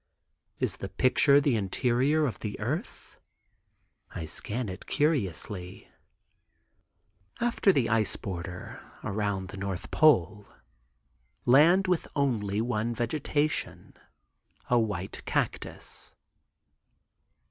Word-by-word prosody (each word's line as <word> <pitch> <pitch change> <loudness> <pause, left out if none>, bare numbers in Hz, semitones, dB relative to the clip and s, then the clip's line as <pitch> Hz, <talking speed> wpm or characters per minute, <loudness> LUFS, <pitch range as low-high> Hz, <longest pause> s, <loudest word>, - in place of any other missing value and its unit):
Is - - -1
the - - -6
picture 140 +2 +4
the 140 -4 +2
interior 125 +9 +1
of 125 - -3
the 105 -2 -5
earth? - - -5 1.0
I 80 - -4
scan 110 +9 -4
it 95 -1 -8
curiously. 95 - -1 1.5
After 235 -4 +3
the 135 -10 +1
ice 110 -2 +1
border 90 -1 -6 0.2
(around 100 -2 -2
the 100 - -8
north 95 -2 -5
pole) 105 - +3 1.0
land 160 +10 +6
with 180 -3 0
one 135 -7 +1
only 110 +3 -1
vegetation, 145 +5 -2 0.8
a 120 - +5
white 100 -4 -3
cactus. - - -4
115 Hz, 95 wpm, -28 LUFS, 100-140 Hz, 1.5 s, land